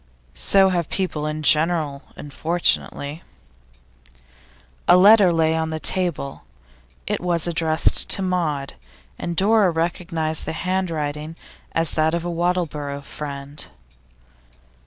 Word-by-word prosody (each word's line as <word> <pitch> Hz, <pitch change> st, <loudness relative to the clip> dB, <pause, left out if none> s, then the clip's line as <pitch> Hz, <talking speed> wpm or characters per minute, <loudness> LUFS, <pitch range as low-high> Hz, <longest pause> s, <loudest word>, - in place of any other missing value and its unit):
'So 195 Hz, -1 st, +4 dB
have 175 Hz, -4 st, -1 dB
people 160 Hz, -6 st, -2 dB
in 155 Hz, 0 st, -4 dB
general, 155 Hz, -2 st, +2 dB
unfortunately.' 150 Hz, 0 st, -1 dB, 1.7 s
A 180 Hz, -, +7 dB
letter 200 Hz, 0 st, +7 dB
lay 160 Hz, -1 st, +2 dB
on 160 Hz, 0 st, -1 dB
the 160 Hz, 0 st, -4 dB
table. 175 Hz, -6 st, -1 dB, 0.6 s
It -, -, -2 dB
was 175 Hz, -2 st, +1 dB
addressed 165 Hz, -2 st, +1 dB
to 195 Hz, -, 0 dB
Maud, 160 Hz, -7 st, -1 dB, 0.5 s
and 170 Hz, -, -4 dB
Dora 205 Hz, +1 st, +4 dB
recognised 165 Hz, -1 st, 0 dB
the -, -, -3 dB
handwriting 160 Hz, -4 st, -3 dB, 0.4 s
as 165 Hz, -1 st, +1 dB
that 155 Hz, +1 st, +1 dB
of 170 Hz, 0 st, -3 dB
a 175 Hz, -, -2 dB
Wattleborough 165 Hz, -5 st, -2 dB
friend. 140 Hz, 0 st, -6 dB
165 Hz, 115 wpm, -22 LUFS, 150-180 Hz, 1.7 s, A